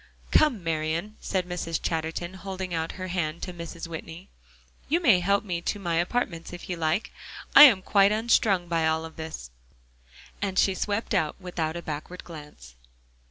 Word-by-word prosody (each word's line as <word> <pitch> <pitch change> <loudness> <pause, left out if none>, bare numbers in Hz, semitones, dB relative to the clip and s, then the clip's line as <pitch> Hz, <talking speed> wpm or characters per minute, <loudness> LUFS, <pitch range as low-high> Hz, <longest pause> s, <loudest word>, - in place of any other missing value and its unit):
"Come, 260 - +3
Marian," 165 +5 -2
said 185 -2 -1
Mrs. 165 -2 -3
Chatterton, 165 +2 -3
holding 190 -1 -6
out 165 0 -2
her 185 0 -6
hand 170 -2 -2
to 180 - -4
Mrs. 170 0 -7
Whitney. 165 +2 -8 0.6
"You 330 +4 +3
may 235 - +5
help 200 +3 +2
me 175 -4 -3
to 205 - -2
my 170 -4 -1
apartments 175 -2 -1
if 175 -1 -9
you - - -1
like. 165 +4 -1 0.4
I - - +13
am 205 -9 +5
quite 200 0 +4
unstrung 215 -4 +2
by 165 -1 +1
all 160 0 0
this," 160 - -8 0.9
and 195 -2 -2
she 195 - +4
swept 205 +4 -2
out 160 -6 +1
without 175 -4 -3
a 170 - -7
backward 155 +4 -6
glance. 150 - -12
175 Hz, 165 wpm, -26 LUFS, 160-195 Hz, 0.9 s, I